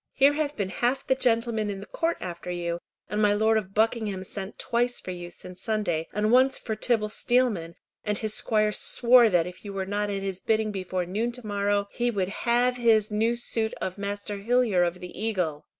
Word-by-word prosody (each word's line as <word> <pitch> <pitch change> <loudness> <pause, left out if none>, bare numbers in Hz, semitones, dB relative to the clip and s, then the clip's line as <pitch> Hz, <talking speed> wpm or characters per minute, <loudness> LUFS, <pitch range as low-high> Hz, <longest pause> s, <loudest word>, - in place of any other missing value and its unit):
Here 275 +2 +5
have 295 -1 -2
been 200 -3 -2
half 245 +7 -1
the - - +3
gentlemen 230 -4 +1
in 195 -1 -4
the 200 - -8
Court 330 +8 -1
after 175 0 -6
you, 170 -1 -2 0.3
and 210 +3 -1
my 205 -1 +4
Lord 220 +2 +3
of 195 -3 -2
Buckingham 215 -3 +1
sent 190 +1 -7
twice 245 +1 0
for 185 - -6
you 175 -1 -7
since 180 +1 -10
Sunday, 200 -7 -1
and 210 +2 0
once 260 +2 +5
for 220 - -4
Tibble 215 -1 +1
Steelman, 215 -8 0 0.3
and 210 -1 -1
his 220 -1 -3
squire 215 -1 +2
swore 240 +2 +5
that 175 -4 +3
if 180 +1 -9
you 200 -1 -7
were 190 -1 -2
not 205 +1 -1
at 195 -1 -3
his 190 -1 -3
bidding 220 0 0
before 185 -2 -3
noon 215 +7 -1
to 250 -1 -8
morrow, 205 0 0
he 240 0 0
would 195 -5 -1
have 245 +4 +1
his 220 -3 +3
new 225 +3 +1
suit 225 -2 -1
of 185 +1 -4
Master 200 0 -4
Hillyer 230 -3 +2
of 175 +1 0
the 180 +3 -8
Eagle." 180 -9 -2
210 Hz, 210 wpm, -26 LUFS, 190-235 Hz, 0.3 s, Here